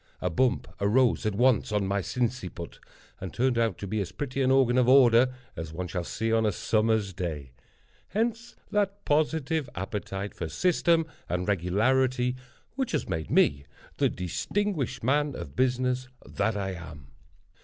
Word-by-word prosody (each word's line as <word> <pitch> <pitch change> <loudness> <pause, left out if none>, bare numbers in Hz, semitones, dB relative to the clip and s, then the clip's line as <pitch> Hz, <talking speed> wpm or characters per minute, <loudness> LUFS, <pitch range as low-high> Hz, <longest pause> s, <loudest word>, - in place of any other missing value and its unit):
A 90 - -1
bump 130 +9 +1
arose 115 +2 +3
at 105 - -1
once 120 0 +3
on 105 -2 +1
my 100 +1 0
sinciput, 115 -7 -3 0.4
and 95 - -6
turned 125 -1 +1
out 115 -6 +1
to - - -6
be 105 +2 -1
as 95 - -4
pretty 135 -1 -3
an 130 - +3
organ 130 -2 +4
of 125 - +3
order 125 -1 +6 0.2
as 80 0 -6
one 90 +2 -4
shall 90 0 -3
see 115 +6 -2
on 115 0 +3
a 105 - +2
summer's 110 0 +1
day. 80 -8 -5 0.6
Hence 230 +3 -2 0.2
that 205 -1 0
positive 155 0 +1
appetite 95 +1 -4
for - - -5
system 170 -2 +2 0.2
and 90 +1 -1
regularity 125 +7 +1 0.4
which 265 -5 -2
has 150 - -1
made 80 -1 -3
me 70 0 +3 0.3
the - - +3
distinguished 150 - -2
man 145 +2 +1
of 70 - -8
business 125 0 +1 0.2
that 110 -2 -1
I 95 -1 -2
am. 80 -7 -10
115 Hz, 160 wpm, -27 LUFS, 95-130 Hz, 0.6 s, order